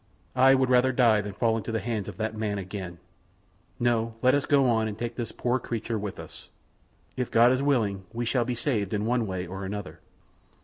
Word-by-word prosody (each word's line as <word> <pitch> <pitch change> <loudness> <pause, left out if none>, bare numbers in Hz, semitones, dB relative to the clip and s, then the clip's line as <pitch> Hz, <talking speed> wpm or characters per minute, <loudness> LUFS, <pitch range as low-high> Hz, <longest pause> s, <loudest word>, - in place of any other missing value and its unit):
I 130 +1 +6
would 130 -1 +1
rather 125 +1 +4
die 115 -4 +4
than 105 0 -6
fall 110 +3 +1
into 115 +1 -4
the 115 - 0
hands 110 -4 -3
of - - -8
that 110 0 -2
man 105 -2 -2
again. 95 -2 -6 0.8
No, 115 -1 +1
let 130 +1 +5
us 145 -1 +1
go 140 -3 +4
on 110 -2 +2
and 105 -1 -5
take 120 0 -4
this 120 -3 -5
poor 125 +1 0
little 125 - -11
creature 115 -1 -2
with 100 -1 -5
us. - - -11 0.7
If 125 -1 -2
God 120 +2 +5
is 130 +1 +1
willing 110 -9 0
we 120 +1 -3
shall 120 +1 +1
be 120 +1 -3
saved 110 -5 -1
in 105 +1 -1
one 120 -1 +1
way 95 -1 -3
or 95 +2 -7
another." 100 0 -6
115 Hz, 220 wpm, -27 LUFS, 105-125 Hz, 0.8 s, I